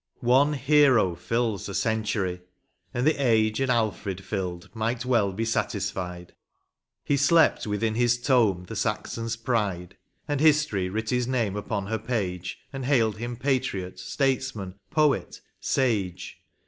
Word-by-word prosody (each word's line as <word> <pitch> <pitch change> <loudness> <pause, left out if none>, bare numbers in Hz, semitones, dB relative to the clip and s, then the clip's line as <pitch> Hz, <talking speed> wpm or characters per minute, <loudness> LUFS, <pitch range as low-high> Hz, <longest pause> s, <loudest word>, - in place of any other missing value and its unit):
One 140 +4 +5
hero 135 - +4
fills 115 +1 -2
a 100 - -5
century, 105 -5 -1 0.5
and 125 +1 -1
the 155 -2 +2
age 110 -2 +3
An 135 -1 0
Alfred 110 -5 -1
filled 90 -4 -4
might 115 +2 -2
well 115 -6 +2
be 110 +4 -2
satisfied; 95 -5 -3 0.7
He 145 - +1
slept 155 -2 +4
within 105 +2 0
his 120 +1 +2
tomb 115 -8 +2
the - - -7
Saxon 115 - -2
s 115 0 -2
pride, 105 -7 -2 0.3
And 145 -2 -1
History 150 -12 +3
writ 110 +4 -3
his 125 -1 +1
name 115 -6 0
upon 105 -1 -3
her 110 +2 -2
page, 95 -6 -3 0.2
And 135 -1 -4
hailed 115 -6 +2
him 120 +2 -5
patriot, 125 -9 -1
statesman, 130 -8 -1 0.2
poet, 150 -2 +1 0.2
sage. 100 -9 -1
115 Hz, 140 wpm, -26 LUFS, 100-130 Hz, 0.7 s, One